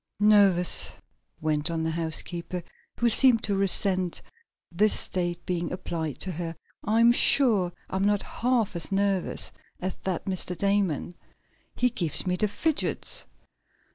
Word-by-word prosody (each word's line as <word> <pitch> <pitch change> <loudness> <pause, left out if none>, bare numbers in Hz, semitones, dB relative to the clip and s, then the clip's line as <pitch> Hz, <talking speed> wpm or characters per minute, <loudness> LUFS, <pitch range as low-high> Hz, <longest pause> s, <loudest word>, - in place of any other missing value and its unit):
"Nervous!" 200 -4 +4 0.5
went 155 0 -1
on 165 -1 -2
the 160 - -1
housekeeper, 170 +2 -3 0.3
who 240 - +1
seemed 235 0 +5
to 205 - -1
resent 190 -2 +1 0.5
this 205 +5 +3
state 175 -1 -2
being 175 -2 -2
applied 165 -5 -4
to 185 - -2
her. 165 0 -5 0.3
"I'm 230 +3 +4
sure 225 -8 +5 0.2
I'm 190 +1 -2
not 205 -1 +1
half 235 -5 -1
as 170 +1 -4
nervous 195 -1 -1 0.3
as 185 0 -3
that 185 -3 -4
Mr. 185 -2 -2
Damon. 195 -4 0 0.6
He 250 0 +1
gives 170 - -1
me 180 -1 0
the 210 +4 0
fidgets." 295 +10 -1
185 Hz, 135 wpm, -26 LUFS, 170-205 Hz, 0.6 s, seemed